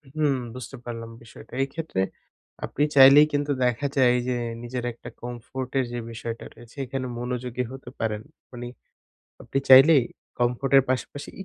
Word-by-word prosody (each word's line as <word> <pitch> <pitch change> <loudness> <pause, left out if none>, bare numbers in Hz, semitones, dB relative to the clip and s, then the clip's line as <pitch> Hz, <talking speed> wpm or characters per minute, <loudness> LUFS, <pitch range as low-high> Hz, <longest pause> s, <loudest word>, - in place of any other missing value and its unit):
হুম, 150 -3 +2 0.2
বুঝতে 130 +1 -8
পারলাম 115 -1 -6
বিষয়টা। 115 - -15
এইক্ষেত্রে 145 -6 -3 0.6
আপনি 145 - -1
চাইলেই 140 +2 +9
কিন্তু 145 0 0
দেখা 125 +3 0
যায় 125 -2 +5
যে, 125 - 0 0.3
নিজের 120 +1 -4
একটা 115 - -11
কমফোর্টের 125 +2 -3
যে 120 - -3
বিষয়টা 115 0 -6
রয়েছে, 120 -1 -16
এখানে 130 0 -4
মনোযোগী 125 0 -3
হতে 135 -2 -9
পারেন। 110 -2 -1 0.3
মানি, 120 -1 -7 0.7
আপনি 135 - -2
চাইলেই 135 +2 +9 0.4
কমফোর্টের 135 +3 +3
পাশাপাশি 130 +2 -3
125 Hz, 135 wpm, -25 LUFS, 120-135 Hz, 0.7 s, চাইলেই